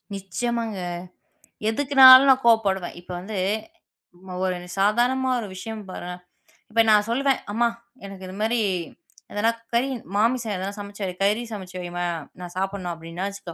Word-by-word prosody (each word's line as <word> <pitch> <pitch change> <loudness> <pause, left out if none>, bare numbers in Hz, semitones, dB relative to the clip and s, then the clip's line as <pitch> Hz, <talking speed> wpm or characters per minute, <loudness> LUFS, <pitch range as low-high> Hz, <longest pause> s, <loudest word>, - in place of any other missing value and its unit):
நிச்சியமாங்க. 225 +3 -3 0.9
எதுக்குன்னாலும் 265 +1 +8
நான் 260 -1 +2
கோபப்படுவேன். 200 -6 +2
இப்ப 180 - -12
வந்து 200 +3 -6 1.1
ஒரு 185 -1 -1 0.2
சாதாரணமா 245 +6 +2
ஒரு 215 - -5
விஷயம் 220 +3 -6
பாருங்க 180 0 -6 0.6
இப்ப 230 +1 +4
நான் 210 -1 +5
சொல்லுவேன். 270 +2 +1
அம்மா 235 +3 +2 0.4
எனக்கு 195 -1 -9
இது 185 - -8
மாரி 225 +2 +1 0.7
எதனா 215 +2 +1 0.2
கறி 245 +3 +2 0.3
மாமிசம் 230 0 +1
எதனா 190 +2 -3
சமைச்சு, 200 0 -7 0.2
கறி 210 +4 +2
சமைச்சு 190 -4 -8
வைம்மா 175 0 -4 0.3
நான் 175 -1 -8
சாப்பிடணும் 190 -1 -2
அப்டின்னா 165 +3 -6
வச்சுக்கோ. 200 -4 -8
210 Hz, 135 wpm, -24 LUFS, 190-235 Hz, 1.1 s, எதுக்குன்னாலும்